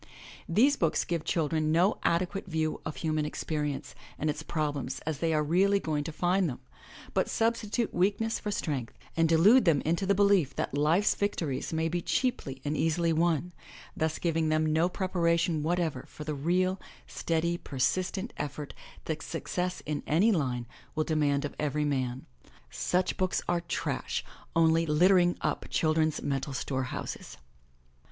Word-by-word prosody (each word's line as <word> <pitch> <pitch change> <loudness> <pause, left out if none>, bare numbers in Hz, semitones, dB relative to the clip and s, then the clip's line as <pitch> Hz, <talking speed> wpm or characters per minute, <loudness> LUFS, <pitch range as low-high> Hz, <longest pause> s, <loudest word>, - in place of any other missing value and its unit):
These 255 +12 +4
books 165 -3 +1
give 170 -3 -2
children 155 -1 0
no 180 +6 +3
ade 170 +2 +2
quate 195 +1 -6
view 160 -2 -1
of 155 - -5
human 155 -2 -1
experience 150 -1 -3 0.2
and 155 0 0
its 150 - -6
problems 145 -5 -2
as 155 -3 -3
they 165 -1 +1
are 155 -1 +2
really 195 +6 +3
going 155 -5 -1
to 165 - -3
find 175 +3 +1
them, 125 - -6 0.5
but - - +1
substitute 230 0 0
weakness 205 +5 +1
for 210 - -4
strength, 145 - -3 0.2
and 165 -1 +3
de 165 - +5
lude 210 +9 +6
them 160 -5 +4
into 170 +5 0
the 200 - +3
belief 200 -7 +3
that - - -2
life's 160 +8 +3
victories 165 -9 -2
may 160 0 0
be 175 +1 -1
cheaply 140 - -1
and 145 +1 0
easily 165 +2 +1
won, 170 +1 +1 0.4
thus 160 0 -1
giving 165 -2 0
them 155 0 +2
no 165 +3 +3
preparation 170 -4 +1
whatever 160 -4 -1
for 150 - -9
the 150 0 -3
real, 180 +6 0 0.2
steady, 170 +1 -1
persistent 180 - -1
effort 145 0 -5 0.3
that 160 -1 -3
success 180 +2 -3
in 150 -1 -2
any 185 +9 +4
line 130 - 0 0.3
will 155 - +1
demand 145 -2 +1
of 145 - -5
every 150 0 0
man. 130 -3 -1 0.5
Such 180 +1 0
books 185 0 0
are 175 -1 +1
trash 170 - -3
— - - -26
only 165 0 +4
littering 175 +3 +4
up - - -2
children's 155 -1 +1
mental 140 0 -2
store 130 0 -2
houses. 125 - -6
160 Hz, 165 wpm, -29 LUFS, 150-180 Hz, 0.5 s, lude